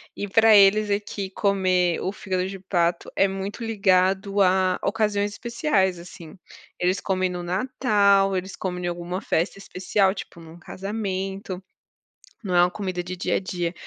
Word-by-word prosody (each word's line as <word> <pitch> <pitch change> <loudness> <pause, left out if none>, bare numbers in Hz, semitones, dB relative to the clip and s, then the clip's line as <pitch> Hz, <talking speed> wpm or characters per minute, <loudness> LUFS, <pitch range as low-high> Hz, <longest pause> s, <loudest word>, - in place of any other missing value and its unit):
e 205 - -4
pra 220 +2 +5
eles 205 +1 +5
aqui 200 -1 -3
comer 185 -4 +1
o 190 - -2
fígado 185 -2 -3
de 195 0 -7
pato 175 -2 -1
é 195 - +4
muito 195 +4 -5
ligado 195 -2 +1
a 185 -1 +3
ocasiões 205 -1 0
especiais, 205 - 0
assim, 170 0 -12 0.4
eles 180 +2 +1
comem 185 -1 0
no 180 -1 -5
Natal, 200 -1 +2
eles 190 +1 -5
comem 180 -1 -4
em - - 0
alguma 175 +1 -4
festa 175 +2 -1
especial, 190 0 0
tipo, 180 -3 -9
num 165 +1 -13
casamento, 195 -1 -5 0.8
não 180 -3 -2
é 175 - +6
uma 180 - +1
comida 185 -3 -4
de 185 +1 -6
dia 180 - -1
a - - +2
dia, 175 -2 -3
190 Hz, 160 wpm, -24 LUFS, 180-200 Hz, 0.8 s, é